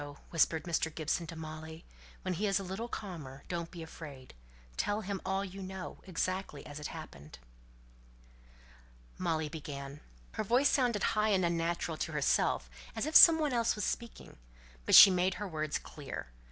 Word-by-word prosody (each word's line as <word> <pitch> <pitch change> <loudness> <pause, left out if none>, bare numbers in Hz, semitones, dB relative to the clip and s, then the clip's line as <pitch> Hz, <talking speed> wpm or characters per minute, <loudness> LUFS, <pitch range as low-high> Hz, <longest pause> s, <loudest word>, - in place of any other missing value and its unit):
whispered 165 -1 +2
Mr. 165 -2 0
Gibson 160 +1 -1
to 165 - -7
Molly. 160 0 -8 0.4
"When 185 - -1
he's 200 +2 +1
a - - -5
little 190 +5 -5
calmer, 160 - -7
don't 170 -1 -4
be 170 -3 -8
afraid; 145 -5 -10 0.4
tell 205 - -1
him 200 -2 -4
all 195 +1 -1
you 195 +1 -8
know, 190 0 -7
exactly 185 -3 -3
as 145 0 -8
it 150 - -4
happened." 75 - -10 1.8
Molly 160 -4 0
began. 145 -2 -7 0.3
Her - - -3
voice 245 +7 +3
sounded 240 -7 +1
high 215 0 +2
and 190 -3 +3
unnatural 170 -1 -1
to - - -3
herself, - - +1 0.3
as - - -1
if 310 +1 -4
some 330 -2 +10
one 300 -4 0
else 235 -1 +2
was 210 - -2
speaking, 235 - -5 0.5
but - - +6
she 195 - +12
made 185 +1 +1
her 205 - -5
words 155 -3 -2
clear. 140 - -8
175 Hz, 165 wpm, -32 LUFS, 155-200 Hz, 1.8 s, she